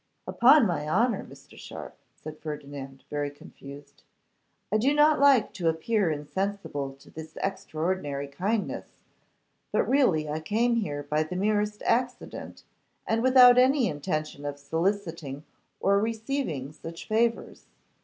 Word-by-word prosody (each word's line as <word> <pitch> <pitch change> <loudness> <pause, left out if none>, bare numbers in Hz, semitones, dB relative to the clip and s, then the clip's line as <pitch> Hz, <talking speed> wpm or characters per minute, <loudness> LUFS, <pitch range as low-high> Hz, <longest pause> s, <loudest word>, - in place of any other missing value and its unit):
'Upon 260 +2 +6
my 155 -6 -1
honour, 235 +9 +2
Mr. - - -15
Sharpe,' - - -9 0.2
said 155 -1 -10
Ferdinand, 140 -3 -7
very 145 -1 -1
confused, 140 0 -13 0.7
'I 215 - +3
do 270 +6 +3
not 300 0 +5
like 275 -5 +5
to 170 -4 0
appear 190 +4 0
insensible 150 -2 -3
to 135 - -19
this 160 0 -10
extraordinary 160 -6 -2
kindness, 195 +10 -3 0.7
but - - +1
really 195 - +3
I 150 +1 -2
came 230 +9 +1
here 145 -10 -2
by 150 +2 0
the 155 +3 -4
merest 210 +2 0
accident, 250 +1 -2 0.4
and 225 0 0
without 250 -1 +7
any 260 -1 +4
intention 155 -1 -3
of 145 0 -4
soliciting 160 -2 -2 0.4
or 200 0 +3
receiving 220 - -2
such 165 +2 -9
favours. 230 +2 -1
180 Hz, 130 wpm, -27 LUFS, 150-230 Hz, 0.7 s, without